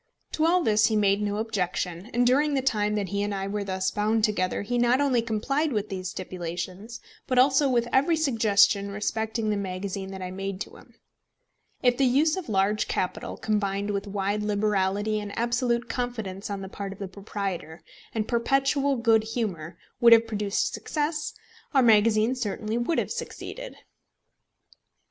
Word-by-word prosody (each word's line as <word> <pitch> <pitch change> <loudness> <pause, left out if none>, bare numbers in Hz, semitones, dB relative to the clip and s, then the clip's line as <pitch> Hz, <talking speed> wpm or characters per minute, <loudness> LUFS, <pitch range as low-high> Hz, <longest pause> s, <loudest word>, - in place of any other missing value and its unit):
To 315 +1 +1
all 355 +1 +3
this 215 -3 +4
he 220 - 0
made 200 -1 +3
no 205 0 -1
objection; 190 -3 -2
and 245 +1 +2
during 285 +4 +3
the 265 - 0
time 210 -5 +1
that 200 -3 -2
he 200 0 -1
and 205 0 -1
I 195 0 -3
were 205 +1 -2
thus 190 -1 -1
bound 215 +1 +1
together, 200 -3 0
he 245 +4 -1
not 240 +2 +3
only 270 -4 +2
complied 270 +7 -1
with 210 -3 -2
these 185 -1 -4
stipulations, 185 +4 -6 0.3
but 255 - 0
also 270 +2 +5
with 240 -2 +1
every 285 +6 +4
suggestion 220 -8 +3
respecting 220 +2 -2
the 210 - 0
magazine 190 0 -4
that 190 -1 -7
I 180 - -5
made 195 0 -4
to - - -6
him. - - -19 0.9
If 245 -1 +4
the 275 - +3
use 290 +5 +3
of 375 -9 -6
large 205 +1 +1
capital, 180 - -3
combined 205 -1 -1
with 200 0 -3
wide 200 +1 -1
liberality 205 0 0
and 205 -1 -7
absolute 240 0 0
confidence 220 -7 -4
on 200 -1 -4
the 190 - -6
part 195 0 -6
of - - -15
the 200 - -5
proprietor, 190 -5 -5 0.3
and 215 -2 -2
perpetual 275 +3 +1
good 230 -2 +3
humour, 190 -8 -4 0.2
would 235 -1 +8
have 230 0 +6
produced 210 -2 -1
success, 300 0 -2 0.4
our 265 - +6
magazine 220 +1 +4
certainly 215 -2 -3
would 240 +8 0
have - - -1
succeeded. - - -6
215 Hz, 170 wpm, -26 LUFS, 195-245 Hz, 0.9 s, would